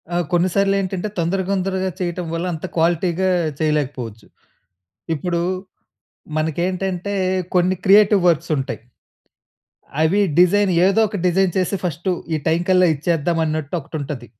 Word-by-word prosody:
ఆ! - - +2
కొన్ని 175 +1 +2
సార్లు 195 0 +3
ఏంటంటే 190 +1 -3
తొందర, 175 +3 0
తొందరగా 190 -1 -1
చేయటం 175 0 -3
వల్ల 165 +2 -2
అంత 160 +3 -6
క్వాలిటీ‌గా 175 +2 +1 0.3
చేయలేకపోవచ్చు. 135 -8 -2 0.9
ఇప్పుడు, 170 +3 -2 1.0
మనకేంటంటే 180 +4 -2 0.4
కొన్ని 180 +1 +3
క్రియేటివ్ 205 0 +5
వర్క్స్ 165 0 +1
ఉంటాయి. 135 -4 -4 1.2
అవి 185 +6 +3 0.2
డిజైన్ 190 +2 +4
ఏదో 200 +3 +3
ఒక 210 - -5
డిజైన్ 180 0 +2
చేసి 185 +2 0
ఫస్టు 170 +2 -2 0.2
ఈ - - +2
టైమ్‌కల్లా 175 +2 +3
ఇచ్చేద్దాం 165 +2 0
అన్నట్టు 155 +1 -3
ఒకటి 150 +3 -8
ఉంటది. 135 -4 -6
175 Hz, 125 wpm, -20 LUFS, 160-190 Hz, 1.2 s, క్రియేటివ్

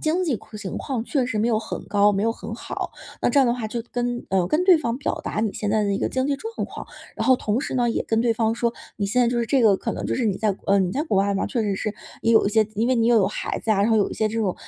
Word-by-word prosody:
经 340 +4 +1
济 280 -9 0
况 215 - -12
情 195 -4 -5
况 255 -5 -3
确 265 0 0
实 225 -3 -2
没 225 +3 +2
有 220 - +2
很 220 - -6
高、 205 0 +4
没 195 +1 0
有 230 - +2
很 225 - -6
好， - - -5 0.3
那 - - +3
这 280 - +4
样 265 - +4
的 235 - +2
话 240 -3 -4
就 230 +2 -4
跟 245 0 -2
呃， 185 -2 +1
跟 305 - +1
对 370 -2 +7
方 245 -5 -2
表 285 - -3
达 - - -2
你 220 -1 0
现 210 - -2
在 215 0 +2
的 200 - 0
一 - - 0
个 - - -1
经 260 0 0
济 280 -1 0
状 450 +7 -7
况。 - - -9 0.3
然 - - -2
后 260 - +7
同 215 -2 -1
时 - - -4
呢， 245 -2 +2
也 - - -1
跟 225 0 +1
对 230 -1 +2
方 225 0 +1
说， 235 0 -1 0.2
你 200 - -1
现 250 +5 +2
在 - - +3
就 240 0 0
是 235 - 0
这 260 +2 +2
个 210 -3 +6
可 - - -3
能 - - -5
就 - - -1
是 250 - 0
你 200 -3 0
在 215 -2 +1
国 190 - -15
嗯， 190 -2 +3
你 175 - -4
在 285 - 0
国 310 -11 -1
外 200 +1 +2
嘛， 195 - -1
确 235 -4 -1
实 200 -2 0
是 210 +1 -3 0.3
也 230 - +1
有 225 - +5
一 - - +1
些 220 0 +4
自 215 -1 -10
因 230 - +2
为 260 - +3
你 230 -2 +2
又 240 0 +5
有 200 -4 +4
孩 200 - -3
子 225 - -3
啊， 205 -2 +3
然 210 +3 +2
后 220 - +4
有 205 - +2
一 - - -5
些 220 - 0
这 225 +2 -3
种， 200 -5 0
225 Hz, 370 characters per minute, -23 LUFS, 210-245 Hz, 0.3 s, 对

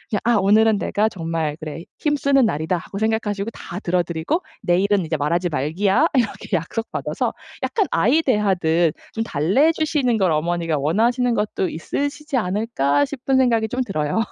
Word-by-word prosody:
야 - - +1
'아 235 0 +3
오늘은 210 +2 +4
내가 210 +1 +1
정말 165 -5 -3
그래 155 +1 -7 0.2
힘쓰는 280 -3 +2
날이다.' 160 -2 0
하고 185 +3 -8
생각하시고 220 -1 -1
다 180 -4 -8
들어 180 -1 +1
드리고 170 - -2 0.2
"내일은 190 +2 +2
이제 160 0 -2
말하지 170 +5 0
말기야." 190 - +1
이렇게 225 -5 0
약속받아서 225 +8 -3 0.3
약간 415 -4 +1
아이 255 - +3
대하듯 175 - +2 0.2
'좀 225 - -1
달래주시는 260 - +1
걸 190 -5 +2
어머니가 165 0 0
원하시는 235 - +1
것도 205 -3 -1
있으시지 285 - -3
않을까.' 180 - +1
싶은 265 - -1
생각이 230 -4 +3
좀 255 +3 -2
들어요. 155 -3 -1
200 Hz, 375 characters per minute, -21 LUFS, 165-240 Hz, 0.3 s, 오늘은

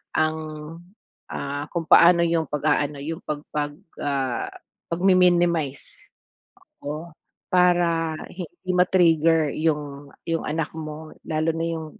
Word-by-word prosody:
ang, 155 0 +2 0.9
ah, 145 +1 -4
kung 170 -2 -1
paano 170 0 +7
yung 165 -2 0
pag-aano, 150 0 0
yung 160 +2 -4
pag 150 -1 -4
pag 145 -1 -1 0.3
ah, 135 -4 -1 0.4
pagmi-minimize. 175 -5 +2 0.8
Oo, 155 +4 -5 0.4
para 175 -3 +3 0.2
hindi 175 +1 -8
ma-trigger 165 -4 +4
yung, 145 -3 -2 0.2
yung 165 0 0
anak 155 0 -2
mo 155 0 -7
lalo 155 0 0
na 165 0 -2
yung, 160 -1 -4
160 Hz, 110 wpm, -24 LUFS, 150-170 Hz, 0.9 s, paano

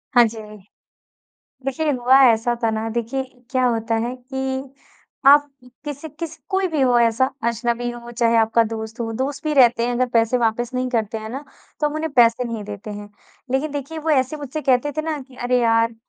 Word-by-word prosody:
हाँ 240 - +8
जी। 225 +1 -9 1.3
देखिए, 295 +3 0
हुआ 255 +1 +4
ऐसा 235 +1 +3
था 225 - +2
ना 220 0 -2
देखिए 235 +4 -2 0.3
क्या 255 -1 +1
होता 230 -1 0
है 245 +2 -3
कि, 265 +1 -4 0.5
आप 290 +1 +7 0.4
किसी 295 +1 -6
किस 335 -2 -5
कोई 380 -1 +1
भी 310 -4 -1
हो 250 -2 +4
ऐसा 235 +2 +3 0.2
अजनबी 235 +1 -1
हो, 240 0 -9
चाहे 235 -1 +2
आपका 225 +1 +4
दोस्त 220 +1 -6
हो 225 -1 -2
दोस्त 275 +4 -3
भी 305 - 0
रहते 240 -3 +5
हैं 245 - -1
अगर 255 +1 +1
पैसे 230 +2 +3
वापस 235 +1 0
नहीं 255 0 -1
करते 225 -2 -1
हैं 220 0 -7
ना, 270 +4 -6 0.4
तो 300 - +3
हम 295 - -7
उन्हें 315 0 -2
पैसे 240 -1 +4
नहीं 230 -2 -4
देते 205 +1 -8
हैं। 205 0 -7 0.4
लेकिन 280 +4 0
देखिए 290 +3 -5
वो 315 +1 -2
ऐसे 260 +1 +2
मुझसे 295 +1 -5
कहते 260 +4 +2
थे 310 - 0
ना, 315 -1 -2
कि 260 -1 -15
"अरे 250 0 +1
यार! 230 0 +2
245 Hz, 200 wpm, -21 LUFS, 230-275 Hz, 1.3 s, हाँ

